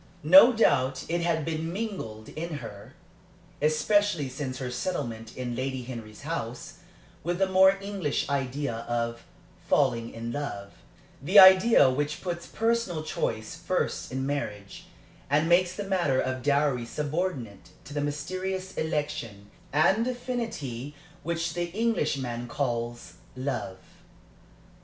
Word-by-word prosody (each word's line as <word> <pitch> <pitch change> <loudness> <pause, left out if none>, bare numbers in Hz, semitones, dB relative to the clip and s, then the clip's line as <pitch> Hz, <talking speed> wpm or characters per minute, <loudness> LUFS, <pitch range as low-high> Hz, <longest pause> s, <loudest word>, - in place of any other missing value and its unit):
No 280 -3 +9
doubt 135 - +2
it 170 +1 0
had 165 -3 0
been 160 0 -2
mingled 180 - -5
in 165 0 -5
her, 105 -7 -9 0.7
especially 155 +1 +2
since 130 -1 -5
her 125 -1 -4
settlement 120 -6 -4
in 125 -2 -3
Lady 130 0 -3
Henry's 115 -2 -9
house, 145 -2 -5 0.4
with 175 +1 -1
the 195 - +3
more 190 +1 +5
English 195 -7 -2
idea 140 -2 -2
of 115 0 -2 0.5
"falling 120 -5 +2
in 115 +1 -5
love" 100 -8 -5 0.5
the 180 +9 +2
idea 190 - +9
which 145 +3 -2
puts 170 -2 -4
personal 225 -8 0
choice 110 -7 -3
first - - -2
in 130 +1 -2
marriage, 105 -8 -4 0.4
and 150 +3 +3
makes 175 +1 +3
the 205 - -4
matter 175 -9 +1
of 130 0 -1
dowry 140 -2 +2
subordinate 145 - -3
to 145 - -10
that 145 - -1
mysterious 185 +6 -3
election 120 -10 -3 0.2
and 190 +10 +3
affinity 225 - -4 0.3
which 170 0 -2
the 175 0 -2
Englishman 140 - -1
calls 120 -2 -3 0.2
"love." 130 -7 -3
145 Hz, 125 wpm, -27 LUFS, 125-180 Hz, 0.7 s, No